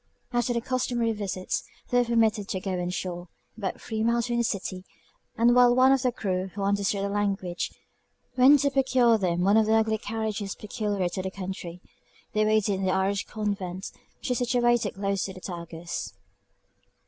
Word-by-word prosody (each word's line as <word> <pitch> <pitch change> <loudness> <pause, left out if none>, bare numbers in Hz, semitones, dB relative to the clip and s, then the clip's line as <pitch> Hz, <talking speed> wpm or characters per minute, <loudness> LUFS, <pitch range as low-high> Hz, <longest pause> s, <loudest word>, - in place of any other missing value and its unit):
After 240 0 +1
the 235 -1 0
customary 245 -2 0
visits, 195 -3 -3 0.3
they 245 - +4
were 245 - +3
permitted 220 -3 +2
to 190 - -2
go 190 +1 -4
on 180 -1 -2
shore, 180 -1 -4 0.3
about 200 -4 -4
three 220 -1 -4
miles 235 0 +2
from 240 -1 -1
the 235 - +2
city; 190 -4 -3 0.5
and 235 +2 +5
while 245 0 +6
one 260 +1 +6
of 270 -1 +3
the 250 -1 +2
crew, 190 -4 -2
who 200 - -3
understood 200 0 +1
the 200 - -1
language, 195 -3 -1 0.7
went 265 +2 +7
to 280 - +2
procure 255 -4 +3
them 175 -2 0
one 200 +4 +4
of 220 -1 +4
the 220 - +4
ugly 220 -1 +2
carriages 215 -2 -3
peculiar 205 -3 -2
to 185 - -4
the 190 - -3
country, 185 -2 -7 0.5
they 215 - +2
waited 215 -2 +2
in - - -3
the 185 - +2
Irish 190 +1 0
convent, 200 -4 -4 0.3
which - - -4
is 250 - +1
situated 240 -3 +2
close 195 -1 -1
to 190 - -6
the 185 - -10
Tagus. 170 -2 -6
210 Hz, 185 wpm, -27 LUFS, 190-235 Hz, 0.7 s, went